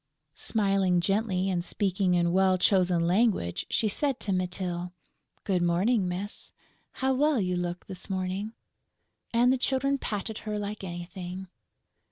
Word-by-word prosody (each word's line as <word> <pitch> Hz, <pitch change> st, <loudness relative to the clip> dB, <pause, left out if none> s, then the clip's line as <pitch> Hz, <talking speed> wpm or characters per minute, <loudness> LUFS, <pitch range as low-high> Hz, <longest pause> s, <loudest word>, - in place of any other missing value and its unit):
Smiling 195 Hz, -4 st, +2 dB
gently 195 Hz, 0 st, +1 dB
and 180 Hz, -3 st, 0 dB
speaking 185 Hz, -1 st, +1 dB
in 170 Hz, -1 st, +2 dB
well 190 Hz, 0 st, +4 dB
chosen 180 Hz, -3 st, +3 dB
language, 185 Hz, -, +1 dB
she 220 Hz, -, +2 dB
said 270 Hz, +4 st, 0 dB
to 200 Hz, -, -1 dB
Mytyl: 180 Hz, -1 st, -2 dB, 0.5 s
"Good 190 Hz, -4 st, +1 dB
morning, 185 Hz, +5 st, +2 dB
miss!... 185 Hz, +4 st, -3 dB, 0.4 s
How 265 Hz, 0 st, +1 dB
well 290 Hz, 0 st, +3 dB
you 180 Hz, -2 st, 0 dB
look 175 Hz, 0 st, -3 dB
this 185 Hz, +1 st, -8 dB
morning!..." 190 Hz, +3 st, -2 dB, 0.8 s
And 245 Hz, +2 st, +4 dB
the 260 Hz, -, 0 dB
Children 275 Hz, +2 st, +1 dB
patted 215 Hz, 0 st, -4 dB
her 210 Hz, -1 st, -4 dB
like 205 Hz, 0 st, -4 dB
anything. 180 Hz, +1 st, -6 dB
190 Hz, 140 wpm, -28 LUFS, 180-215 Hz, 0.8 s, well